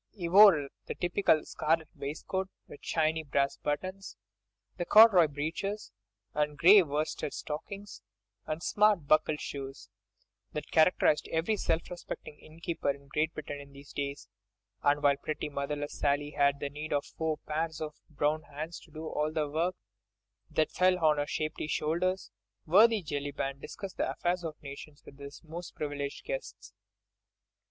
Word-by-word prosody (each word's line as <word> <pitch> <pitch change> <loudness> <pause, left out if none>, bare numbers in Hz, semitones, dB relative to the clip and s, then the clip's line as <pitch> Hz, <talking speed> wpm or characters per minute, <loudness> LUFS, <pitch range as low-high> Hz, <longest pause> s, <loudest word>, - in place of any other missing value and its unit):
He 175 -5 -3
wore 175 -6 +7 0.2
the - - -4
typical 175 -3 +2
scarlet 160 0 0
waistcoat, 185 +6 -4 0.2
with 145 - -11
shiny 160 +1 +1
brass 140 -2 0
buttons, 185 +6 -4 0.6
the 175 - -1
corduroy 205 -4 +8
breeches, 160 - -4 0.4
the 150 0 0
grey 190 +7 +8
worsted 150 -2 -2
stockings 195 - -6 0.5
and 155 +2 -3
smart 210 -6 +3
buckled 155 0 +3
shoes, 135 -1 -7 0.6
that 150 - -5
characterised 160 -2 +4
every 165 +7 0
self 165 -4 0
respecting 175 -3 -7
innkeeper 165 -1 -4
in 140 0 -4
Great 155 +3 0
Britain 145 -1 -6
in 140 0 -12
these 140 +1 -13
days—and 145 +1 -3
while 140 -1 +5
pretty, 150 +1 -4
motherless 145 +1 -4
Sally 145 +1 +1
had 140 -1 +2
need 145 +2 -4
of 145 0 0
four 160 -1 -2
pairs 160 +1 -3
of 155 -1 -4 0.2
brown 150 +1 0
hands 155 +3 -7
to - - -18
do 155 +2 -7
all 155 -1 -1
the 155 -2 0
work 165 +5 0 0.7
that 155 - +1
fell 185 0 +3
on 155 -3 +3
her 145 - -1
shapely 155 0 -3
shoulders, 170 - -1 0.3
worthy 210 +5 +5
Jellyband 140 -2 -3
discussed 195 -2 -8
the - - 0
affairs 175 0 -1
of 160 -2 -4
nations 140 +1 -10
with 140 - -14
his 140 +2 -10
most 170 +2 -8
privileged 145 -1 -4
guests. - - -6
155 Hz, 145 wpm, -30 LUFS, 145-175 Hz, 0.7 s, corduroy